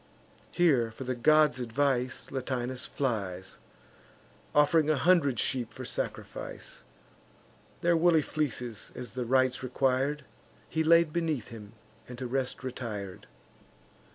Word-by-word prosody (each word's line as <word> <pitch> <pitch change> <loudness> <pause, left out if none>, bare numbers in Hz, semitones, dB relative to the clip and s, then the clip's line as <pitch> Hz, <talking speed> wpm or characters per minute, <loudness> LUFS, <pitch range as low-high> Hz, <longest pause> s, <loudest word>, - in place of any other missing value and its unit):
Here, 140 -10 +3
for 110 +4 -8
the 130 0 -2
gods' 150 +1 +4
advice, 125 +1 -1
Latinus 130 -1 -3
flies, 100 -9 -3 1.0
Off'ring 150 +1 +4
a 155 - +4
hundred 140 -7 +3
sheep 125 +1 -1
for - - -8
sacrifice: - - -5 1.0
Their 170 0 +3
woolly 165 -2 +4
fleeces, 125 -8 -3
as 125 - -7
the 125 -1 -3
rites 130 +1 +2
requir'd, 135 +3 0 0.4
He 160 - 0
laid 165 -1 +5
beneath 160 -8 -1
him, 110 -2 -10 0.3
and 125 - -9
to 130 - -5
rest 130 +1 -2
retir'd. 110 -7 -6
130 Hz, 120 wpm, -29 LUFS, 120-150 Hz, 1.0 s, laid